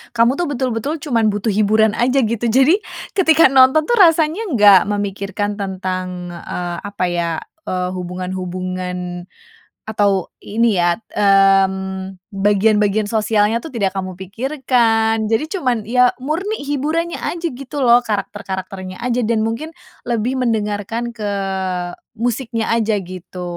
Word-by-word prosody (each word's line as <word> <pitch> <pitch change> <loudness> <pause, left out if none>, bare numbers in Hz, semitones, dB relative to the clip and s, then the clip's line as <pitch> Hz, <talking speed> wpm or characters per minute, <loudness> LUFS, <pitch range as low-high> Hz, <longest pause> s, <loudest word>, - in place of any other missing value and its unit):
kamu 235 +4 +3
tuh 350 - 0
betul-betul 260 0 -2
cuman 235 -8 +1
butuh 210 +2 -1
hiburan 215 +1 +3
aja 255 +3 +2
gitu 230 +1 -1
jadi 265 - +4 0.4
ketika 325 -6 +5
nonton 265 +3 +6
tuh 480 - +3
rasanya 330 +3 +4
enggak 205 -5 +7
memikirkan 205 0 -2
tentang, 185 -2 -4
eee, 175 0 -5
apa 200 -2 -2
ya, 170 -1 -1 0.4
eee, 180 0 -1
hubungan-hubungan 180 0 -5 0.7
atau 200 -4 +1
ini 225 -2 0
ya, 175 0 +3
mmm, 195 -2 +2 0.2
bagian-bagian 205 +1 +2
sosialnya 215 0 +2
tuh 260 +2 -10
tidak 200 -4 +1
kamu 185 -1 -3
pikirkan, 225 +1 0
jadi 225 +6 +1
cuman 250 -8 0
ya 250 +1 +4
murni 345 +8 -2
hiburannya 305 +4 -2
aja 340 0 -3
gitu 275 +2 -6
loh, 240 -1 +6
karakter-karakternya 190 -2 -5
aja 245 -1 0
dan 225 -1 +1
mungkin 230 +9 -3 0.3
lebih 240 +2 -1
mendengarkan 225 -1 -1
ke 220 -3 -6 0.9
musiknya 230 0 -2
aja 225 -1 +1
gitu. 180 0 -9
215 Hz, 125 wpm, -18 LUFS, 190-250 Hz, 0.9 s, enggak